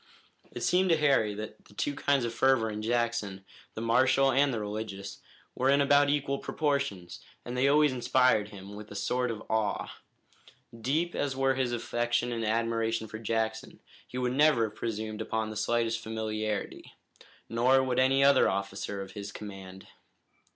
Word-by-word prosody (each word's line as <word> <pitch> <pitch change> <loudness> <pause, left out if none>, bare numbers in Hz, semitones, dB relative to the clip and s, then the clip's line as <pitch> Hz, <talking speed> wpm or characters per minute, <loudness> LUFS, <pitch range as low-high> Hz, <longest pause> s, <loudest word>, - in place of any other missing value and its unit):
It - - -7
seemed 185 +1 +3
to 165 - +4
Harry 135 -9 +2
that 110 +1 -8
the 105 - -19
two 145 - -1
kinds 140 -2 +1
of 115 - -3
fervor 130 -4 +2
in 105 0 -5
Jackson, 115 -4 -1 0.3
the 110 - -4
martial 130 +3 +4
and 140 +2 +3
the 115 - -2
religious, 105 -2 -5 0.3
were 130 +1 +1
in 140 +1 +4
about 145 0 +4
equal 140 -1 0
proportions, 140 - -2 0.3
and 120 - -5
they 130 +2 +2
always 150 -1 +4
inspired 125 -3 +2
him 100 -1 -10
with 105 +1 -9
a 105 - -10
sort 125 +5 -1
of 110 -2 -5
awe. 110 -2 -1 0.8
Deep 150 +9 -1
as 140 -2 -2
were 135 0 +2
his 130 -2 -1
affection 120 0 -1
and 115 -1 -2
admiration 115 0 0
for 110 +1 -8
Jackson, 110 0 -2 0.3
he 125 - -7
would 125 -1 0
never 145 -4 +4
have 110 -1 -3
presumed 110 -1 -4
upon 110 0 -2
the - - -7
slightest 115 +1 0
familiarity. 110 -1 -4 0.5
Nor 130 +3 +3
would 130 -1 0
any 135 +1 +4
other 140 0 +5
officer 100 0 -3
of 95 - -11
his 100 -1 -7
command. 95 -2 -9
115 Hz, 170 wpm, -29 LUFS, 110-130 Hz, 0.8 s, other